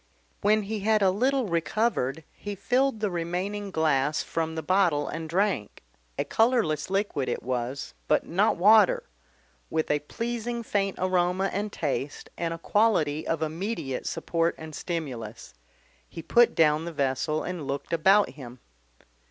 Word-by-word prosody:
When 215 +1 +3
he 215 +2 -3
had 215 +1 +2
a 190 - +5
little 260 +6 +1
recovered 170 - 0
he 205 0 -6
filled 250 +4 +1
the 210 -3 0
remaining 180 +4 -3
glass 150 -3 +1
from 160 -1 -2
the 160 - -3
bottle 180 -6 +2
and 160 -1 -5
drank 185 - -1 0.3
a - - 0
colourless 225 - +1
liquid 195 -9 -1
it - - -3
was, 125 +2 -3
but - - +2
not 195 +6 +2
water, 220 - +5 0.7
with 160 -1 0
a 150 - +2
pleasing 235 +8 -4
faint 195 -3 -1
aroma 185 +1 +1
and 205 +2 -2
taste 145 -4 -3
and 170 -1 -2
a 165 - -4
quality 165 -6 +1
of 165 -1 0
immediate 160 - -3
support 165 0 0
and 160 -1 -9
stimulus. 130 - -5 0.6
He 165 - -8
put 235 +8 +4
down 155 0 +3
the 170 - -4
vessel 140 +2 0
and 175 -6 -5
looked 140 +4 -4
about 195 +5 +4
him. 130 -3 -10
170 Hz, 150 wpm, -27 LUFS, 155-205 Hz, 0.7 s, a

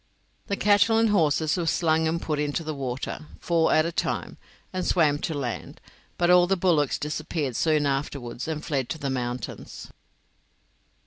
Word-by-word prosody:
The 200 - 0
cattle 205 +2 +4
and 225 0 +4
horses 160 -3 +2
were 170 -2 -1
slung 160 -1 +2
and 165 +1 0
put 150 -3 -2
into 150 +2 -1
the 155 0 -3
water, 135 +2 -5
four 165 -2 +2
at 155 - +4
a 170 - -1
time, - - -2 0.4
and 185 0 -2
swam 150 -6 +2
to 160 - -3
land, 130 -5 -5 0.4
but 175 0 +3
all 180 0 +6
the 195 +1 +1
bullocks 165 -6 +2
disappeared 150 -3 -3
soon 155 0 +2
afterwards 135 -3 -3
and 155 -1 -4
fled 135 -4 -1
to 145 - -3
the 140 -3 -3
mountains. 125 -1 -5
155 Hz, 170 wpm, -26 LUFS, 140-170 Hz, 0.4 s, all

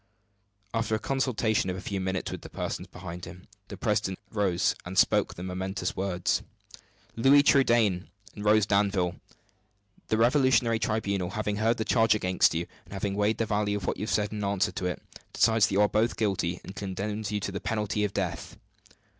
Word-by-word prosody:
After 115 -1 0
a - - -2
consultation 120 -7 0
of 90 - -3
a 95 - -8
few 100 -1 -2
minutes 95 0 -2
with - - -6
the - - -10
persons - - -4
behind 90 -1 -8
him, 90 - -11 0.2
the - - -8
president 95 -1 0
rose, 100 -5 +1
and - - -7
spoke - - +3
the 90 - -7
momentous 95 0 -3
words: 95 -2 0 0.7
"Louis 135 +5 +6
Trudaine 115 -10 +3 0.3
and 105 - -8
Rose 105 0 +4
Danville, 100 -4 +1 0.9
the 110 - +1
revolutionary 120 -2 +3
tribunal, 100 -5 -1
having 105 0 -2
heard 115 +2 +2
the 110 - -2
charge 115 -2 +4
against 90 -5 +2
you, 85 +1 -1 0.2
and - - -13
having 100 0 -2
weighed 105 +2 +1
the 115 - 0
value 105 -1 0
of 100 - -6
what - - -1
you 105 - -3
have - - -5
said 105 -1 +1
in 105 -1 -4
answer 100 -1 +1
to 90 - -3
it, 90 - -3 0.3
decides 110 -2 +4
that - - -4
you 100 - +4
are 105 - +5
both 110 +3 +1
guilty, 95 -5 0
and 95 - -9
condemns 105 +1 -4
you 105 - 0
to 100 - -4
the 100 - -5
penalty 105 -1 -1
of 105 - 0
death." 95 -4 -4
105 Hz, 195 wpm, -28 LUFS, 95-110 Hz, 0.9 s, Louis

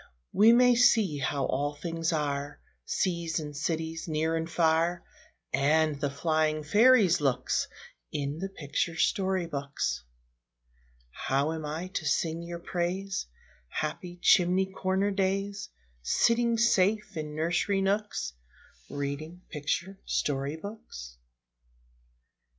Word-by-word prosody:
We 220 +3 +7
may 245 +1 +6
see 225 -10 +4
how 140 0 0
all 145 +2 -1
things 165 +1 -2
are, 145 -2 -2 0.3
Seas 170 -2 -1
and 150 -2 -7
cities, 160 +2 -3
near 160 +1 0
and 165 0 -2
far, 170 +1 +2 0.5
And 150 +2 +2
the 145 - +1
flying 155 +1 0
fairies' 205 -1 +5
looks, 130 -3 +1 0.4
In 145 +2 -3
the 195 +2 -3
picture 165 -1 -2
story 190 +1 +1
books. 140 - -3 1.1
How 140 - 0
am 160 -2 -4
I 160 +4 -4
to 180 -4 -4
sing 165 +1 0
your 170 0 -6
praise, 180 - -2 0.4
Happy 175 - -4
chimney 185 +1 +5
corner 190 +2 0
days, 195 +1 -1 0.3
Sitting 235 - +2
safe 210 -2 +2
in 150 -1 -5
nursery 175 +5 +1
nooks, 200 - -1 0.6
Reading 150 +5 -5
picture 170 +5 -3
story 140 +1 -1
books? 160 - -9
165 Hz, 115 wpm, -29 LUFS, 150-190 Hz, 1.1 s, We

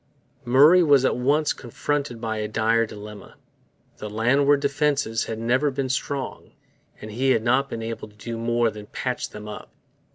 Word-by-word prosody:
Murray 145 +9 +6
was 140 -5 +4
at - - +2
once 145 +4 +1
confronted 135 0 -3
by 110 -1 -3
a 105 0 -2
dire 115 +1 +1
dilemma. 105 0 -11 0.6
The 105 - -6
landward 135 +7 +3
defences 140 -5 0
had 110 - -5
never 125 +6 +1
been 135 -1 -3
strong; 135 +1 -4 0.5
and 110 - -8
he 130 +5 0
had 110 - 0
not 130 +4 +2
been 115 - -5
able 115 -1 -5
to 105 - -21
do 115 +2 -6
more 115 0 +1
than 105 -1 -10
patch 125 +3 -3
them 105 0 -10
up. 105 - -8
120 Hz, 170 wpm, -24 LUFS, 110-140 Hz, 0.6 s, Murray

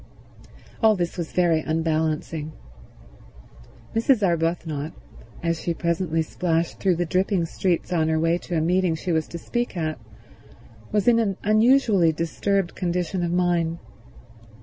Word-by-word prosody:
All 220 -2 +5
this 175 -3 -2
was 170 -3 -4
very 170 -3 +3
unbalancing. 155 -1 -1 1.4
Mrs. 230 0 +3
Arbuthnot, 165 -3 -1 0.5
as 165 -1 -1
she 170 - -2
presently 170 -1 0
splashed 165 0 -1
though 185 -3 +2
the 175 +1 -1
dripping 185 +1 +1
streets 175 +1 -1
on 160 -2 +2
her 160 0 +1
way 165 +2 +2
to 175 -1 -3
a - - +1
meeting 180 0 +2
she 175 +3 -3
was 160 -2 0
to 170 - -7
speak 240 +3 -3
at, 155 -4 -2 0.9
was 210 0 +1
in 235 -1 +6
an 200 -4 0
unusually 215 -5 +4
disturbed 175 +3 -1
condition 180 0 -2
of 170 -1 -1
mind. 175 -2 +1
170 Hz, 140 wpm, -24 LUFS, 160-185 Hz, 1.4 s, in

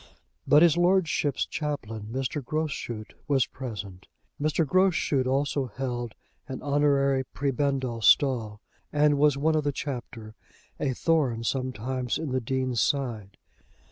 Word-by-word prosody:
But 150 +3 +7
his 170 -1 +5
lordship's 175 -6 +2
chaplain, 115 -9 -4
Mr. 135 +3 -2
Groschut, 140 -7 -4
was 135 -3 +3
present. 100 -7 -8 0.3
Mr. 155 +2 +1
Groschut 165 -6 +2
also 135 0 0
held 120 -1 -4 0.3
an 130 -2 -5
honorary 140 -2 +2
prebendal 135 -3 -1
stall, 110 -2 +3 0.3
and 145 -1 +3
was 145 -1 +4
one 155 +3 +2
of 155 - +1
the 145 - 0
chapter, 120 -6 -6 0.5
a 135 -3 -1
thorn 135 -9 +1
sometimes 130 0 -2
in 155 -4 -4
the 130 0 0
Dean's 130 -1 -1
side. 115 -9 -1
135 Hz, 125 wpm, -27 LUFS, 120-145 Hz, 0.5 s, But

